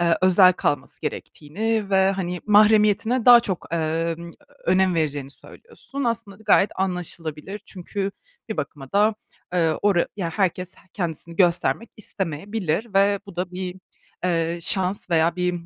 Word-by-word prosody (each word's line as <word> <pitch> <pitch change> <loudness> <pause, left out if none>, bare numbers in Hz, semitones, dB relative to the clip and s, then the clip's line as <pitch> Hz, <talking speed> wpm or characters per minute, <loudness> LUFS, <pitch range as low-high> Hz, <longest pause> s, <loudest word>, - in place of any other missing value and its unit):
eee, 170 -1 +3
özel 185 0 +6
kalması 140 -4 -2
gerektiğini 200 +8 -3
ve, 190 0 +4
hani, 180 -2 -3
mahremiyetine 215 +3 +4
daha 240 -1 +10
çok, 190 -10 -4
emm, 165 +1 -2 0.4
önem 185 0 +3
vereceğini 145 -4 -2
söylüyorsun. 280 - -9
Aslında 230 -4 -3
da 220 - -17
gayet 210 -1 +4
anlaşılabilir 180 0 -4
çünkü 195 +1 -4 0.4
bir 220 - -4
bakıma 140 -2 -6
da, 210 +2 +3 0.4
eee, 165 -3 +2
ora 195 -4 +3
ya 170 -4 -2
herkes 185 -1 -1 0.2
kendisini 170 -2 -4
göstermek 185 +5 +1
istemeyebilir 195 +1 -3
ve 200 0 +3
bu 200 -3 -12
da 180 0 -2
bir, 180 0 -5 0.5
eee, 170 -1 0
şans 185 0 0
veya 165 +1 +2
bir 180 0 0
185 Hz, 140 wpm, -23 LUFS, 165-205 Hz, 0.5 s, daha